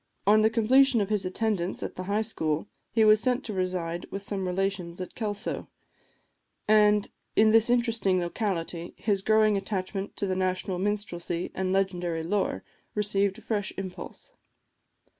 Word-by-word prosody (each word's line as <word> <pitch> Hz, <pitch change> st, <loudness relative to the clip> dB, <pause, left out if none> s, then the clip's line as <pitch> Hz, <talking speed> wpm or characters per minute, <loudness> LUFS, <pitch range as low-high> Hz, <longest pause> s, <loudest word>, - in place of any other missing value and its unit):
On 215 Hz, +2 st, +6 dB
the 220 Hz, -, +4 dB
completion 240 Hz, +3 st, +4 dB
of 200 Hz, -1 st, -1 dB
his 205 Hz, -3 st, +1 dB
attendance 190 Hz, -2 st, -1 dB
at -, -, -4 dB
the 185 Hz, -, -6 dB
High 205 Hz, +3 st, 0 dB
School, 160 Hz, -6 st, -1 dB, 0.2 s
he 225 Hz, -1 st, +4 dB
was 215 Hz, 0 st, +7 dB
sent 255 Hz, +1 st, +1 dB
to 215 Hz, -, -5 dB
reside 180 Hz, -2 st, -2 dB
with 195 Hz, 0 st, -5 dB
some 195 Hz, -2 st, -3 dB
relations 180 Hz, -2 st, -2 dB
at 185 Hz, -, -6 dB
Kelso; 210 Hz, -1 st, -3 dB, 1.0 s
and 210 Hz, -1 st, +4 dB, 0.2 s
in 215 Hz, 0 st, +5 dB
this 225 Hz, +1 st, +5 dB
interesting 230 Hz, -6 st, +2 dB
locality 175 Hz, -2 st, -3 dB
his 205 Hz, -3 st, 0 dB
growing 215 Hz, 0 st, +3 dB
attachment 195 Hz, 0 st, -4 dB
to -, -, -1 dB
the 190 Hz, -1 st, -1 dB
national 185 Hz, 0 st, -1 dB
minstrelsy 180 Hz, -4 st, -2 dB
and 190 Hz, -1 st, -1 dB
legendary 180 Hz, -4 st, 0 dB
lore 195 Hz, +4 st, -1 dB, 0.3 s
received 200 Hz, -2 st, +1 dB
a -, -, -12 dB
fresh 205 Hz, -3 st, -2 dB
impulse. 190 Hz, -2 st, -7 dB
195 Hz, 155 wpm, -27 LUFS, 185-215 Hz, 1.0 s, was